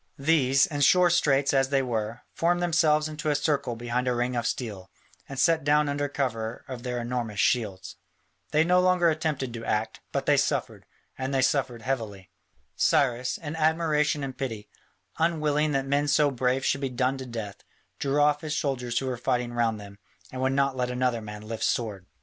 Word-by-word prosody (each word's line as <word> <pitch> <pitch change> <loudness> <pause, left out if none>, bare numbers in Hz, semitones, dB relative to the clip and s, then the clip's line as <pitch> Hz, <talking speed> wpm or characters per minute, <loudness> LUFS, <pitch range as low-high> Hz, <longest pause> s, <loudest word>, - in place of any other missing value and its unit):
These, 135 -2 +3
in 145 -1 -4
sore 180 +5 +5
straits 145 -5 +2
as 135 -1 +2
they 135 -1 +2
were, 115 -1 -3
formed 175 +1 +1
themselves 155 -3 +2
into 155 0 -4
a 145 - +2
circle 145 -4 0
behind 120 +2 -2
a 125 - +1
ring 120 +1 -1
of 120 -1 -1
steel, 105 -8 -4 0.4
and 135 - -7
sat 165 +3 +3
down 150 +1 +3
under 145 0 -1
cover 115 -6 -3
of 130 -2 -7
their 125 -1 -3
enormous 120 -3 -3
shields. 100 -6 0 0.5
They 155 +7 +3
no 180 +2 +3
longer 180 -2 +3
attempted 150 -6 -2
to 115 -1 -6
act, 110 0 -2
but - - -2
they - - +4
suffered, - - -1 0.3
and 130 0 +1
suffered 130 -4 -1
heavily. 110 -7 -4 0.4
Cyrus, 125 -2 +1
in 155 -1 -6
admiration 155 -2 +1
and 135 -2 -5
pity, 115 -6 -5 0.5
unwilling 155 -2 +1
that 135 0 0
men 140 +2 +1
so 145 0 +3
brave 130 +1 0
should 135 - +1
be 135 - -1
done 130 +2 -1
to 130 - -7
death, 110 -4 -7 0.4
drew 140 +1 0
off 145 0 +3
his 150 -1 -3
soldiers 125 -4 -2
who 135 - 0
were 130 -2 -2
fighting 120 0 -1
round 115 -2 0
them, 100 0 -12 0.3
and 130 - -5
would 130 0 +1
not 135 -1 +1
let 125 -1 -1
another 125 -2 0
man 105 0 -8
lift 110 +1 -5
sword. 105 -6 -1
130 Hz, 190 wpm, -27 LUFS, 120-150 Hz, 0.5 s, sore